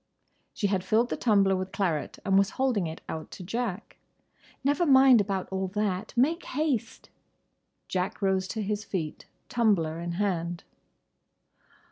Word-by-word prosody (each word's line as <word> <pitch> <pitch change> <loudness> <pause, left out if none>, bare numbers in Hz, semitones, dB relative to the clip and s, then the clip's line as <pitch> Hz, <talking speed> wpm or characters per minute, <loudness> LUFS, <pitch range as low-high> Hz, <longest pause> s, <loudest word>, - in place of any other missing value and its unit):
She 215 - -2
had 195 -2 +1
filled 225 +6 +2
the - - -1
tumbler 200 -4 +3
with 185 0 -3
claret 170 -7 -1
and 195 - +2
was 195 +1 +4
holding 250 -9 +1
it 160 +1 -7
out 160 -1 -5
to 185 - -9
Jack. 220 +1 -4 0.7
"Never 285 +6 +2
mind 265 -6 +7
about 195 -2 -2
all 190 0 -1
that. 205 -1 -1
Make 320 +8 +2
haste." 260 -5 -2 0.8
Jack 185 +3 -2
rose 190 -1 +1
to 220 +2 -3
his 210 +1 -2
feet, 170 -7 -4 0.2
tumbler 190 -9 +1
in 170 0 -4
hand. 175 -2 -2
200 Hz, 145 wpm, -28 LUFS, 185-235 Hz, 0.8 s, mind